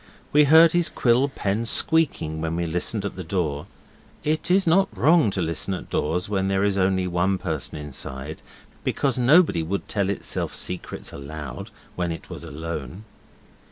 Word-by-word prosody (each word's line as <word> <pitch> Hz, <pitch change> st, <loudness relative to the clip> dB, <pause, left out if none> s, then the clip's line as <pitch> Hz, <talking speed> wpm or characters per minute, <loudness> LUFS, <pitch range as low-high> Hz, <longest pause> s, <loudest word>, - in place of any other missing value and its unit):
We 150 Hz, 0 st, +6 dB
heard 160 Hz, +3 st, +7 dB
his 175 Hz, -1 st, +2 dB
quill 125 Hz, +3 st, +2 dB
pen 105 Hz, -4 st, -2 dB
squeaking 115 Hz, -, +1 dB
when 80 Hz, 0 st, -2 dB
we 85 Hz, 0 st, -1 dB
listened 90 Hz, +5 st, -1 dB
at 100 Hz, -, -4 dB
the 95 Hz, -, -6 dB
door. 80 Hz, -4 st, -2 dB, 0.6 s
It 155 Hz, +2 st, 0 dB
is 190 Hz, +2 st, +4 dB
not 190 Hz, +4 st, +3 dB
wrong 160 Hz, -5 st, +4 dB
to 95 Hz, -2 st, -2 dB
listen 85 Hz, +4 st, -1 dB
at -, -, -9 dB
doors 90 Hz, +4 st, -1 dB
when 95 Hz, -2 st, -1 dB
there 95 Hz, 0 st, +1 dB
is 100 Hz, -1 st, +1 dB
only 95 Hz, -1 st, +1 dB
one 90 Hz, +2 st, 0 dB
person 80 Hz, -5 st, -4 dB
inside, 75 Hz, 0 st, -6 dB, 0.4 s
because 135 Hz, -3 st, 0 dB
nobody 140 Hz, -, +4 dB
would 95 Hz, +5 st, -3 dB
tell 100 Hz, -2 st, 0 dB
itself 100 Hz, -, -2 dB
secrets 90 Hz, -1 st, -4 dB
aloud 70 Hz, -2 st, -7 dB, 0.3 s
when 90 Hz, -1 st, -2 dB
it 80 Hz, -, -8 dB
was -, -, -7 dB
alone. 80 Hz, -, -6 dB
95 Hz, 165 wpm, -24 LUFS, 80-125 Hz, 0.6 s, heard